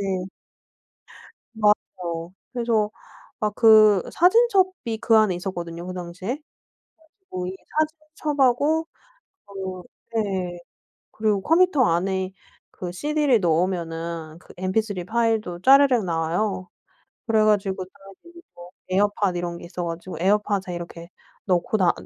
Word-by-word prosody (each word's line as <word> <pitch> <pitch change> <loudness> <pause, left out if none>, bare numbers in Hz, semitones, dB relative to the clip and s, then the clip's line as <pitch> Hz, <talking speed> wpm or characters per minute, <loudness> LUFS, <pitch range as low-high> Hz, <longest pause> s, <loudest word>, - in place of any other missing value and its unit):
네. 190 -2 -2 1.3
맞아요. 180 -5 -1 0.2
그래서 230 -3 +1 0.5
막 210 -1 -1
그 215 -3 +7
사진첩이 375 - +3
그 230 -1 +4
안에 210 -5 +3
있었거든요 175 -2 -5
그 185 - -5
당시에. 180 +1 -7
그래 - - -30 0.9
가지고 180 -1 -4
이 185 - -5 0.6
사진첩하고 295 +2 +2 0.6
어 190 -2 -6 0.3
네. 190 -5 -2 0.5
그리고 210 -3 0
컴퓨터 330 -4 +4
안에 190 +1 0 0.4
그 175 -1 -6
cd를 290 +1 +1
넣으면은 165 -2 -1
그 - - -16
mp3 185 0 -1
파일도 220 -5 0
짜르륵 270 -3 +6
나와요. 175 +3 -1 0.6
그래 220 -1 +3
가지고 195 -3 +1
사람들이 340 - -16
뭐 175 0 -12 0.2
에어팟 205 0 +2
이런 175 0 -3
게 - - -11
있어 175 0 -5
가지고 170 +1 -6
에어팟에 200 -1 +1
이렇게 170 0 -8 0.4
넣고 180 +2 +1
다 180 -3 +4
195 Hz, 265 characters per minute, -24 LUFS, 175-225 Hz, 1.3 s, 그